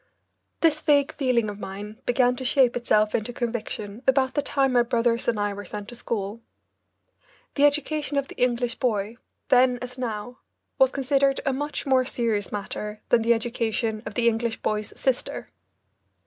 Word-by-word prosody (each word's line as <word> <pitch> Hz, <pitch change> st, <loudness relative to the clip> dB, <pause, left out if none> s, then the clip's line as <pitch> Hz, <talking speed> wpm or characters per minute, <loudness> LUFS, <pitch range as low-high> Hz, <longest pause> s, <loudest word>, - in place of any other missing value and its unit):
This 310 Hz, -2 st, +3 dB
vague 285 Hz, -2 st, +3 dB
feeling 250 Hz, -5 st, +1 dB
of 205 Hz, -1 st, -6 dB
mine 210 Hz, +4 st, -7 dB
began 245 Hz, 0 st, +3 dB
to 260 Hz, -, -5 dB
shape 255 Hz, -1 st, +3 dB
itself 215 Hz, -3 st, +2 dB
into 220 Hz, +2 st, -1 dB
conviction 230 Hz, -3 st, -4 dB
about 265 Hz, -1 st, +3 dB
the 290 Hz, -, +1 dB
time 270 Hz, -2 st, +1 dB
my 245 Hz, -, +5 dB
brothers 235 Hz, -1 st, +1 dB
and 230 Hz, -3 st, +1 dB
I 205 Hz, 0 st, 0 dB
were 205 Hz, +1 st, -7 dB
sent 205 Hz, +2 st, -7 dB
to 240 Hz, -, -8 dB
school. 220 Hz, -2 st, -4 dB, 1.1 s
The 285 Hz, -, +4 dB
education 295 Hz, 0 st, +1 dB
of 280 Hz, -1 st, 0 dB
the -, -, -10 dB
English 245 Hz, -1 st, +1 dB
boy, 220 Hz, -2 st, -1 dB, 0.3 s
then 250 Hz, 0 st, +5 dB
as 250 Hz, +1 st, -8 dB
now, 240 Hz, 0 st, -4 dB, 0.4 s
was 265 Hz, -, +6 dB
considered 275 Hz, 0 st, +2 dB
a 270 Hz, -, +1 dB
much 290 Hz, +2 st, -3 dB
more 260 Hz, -2 st, +4 dB
serious 230 Hz, -6 st, -1 dB
matter 210 Hz, +1 st, -4 dB
than 240 Hz, -, +4 dB
the 235 Hz, +1 st, +4 dB
education 225 Hz, -1 st, -2 dB
of 210 Hz, -, -7 dB
the 235 Hz, -1 st, +2 dB
English 230 Hz, 0 st, 0 dB
boy's 210 Hz, -1 st, -1 dB
sister. 260 Hz, -2 st, -2 dB
240 Hz, 170 wpm, -25 LUFS, 215-260 Hz, 1.1 s, was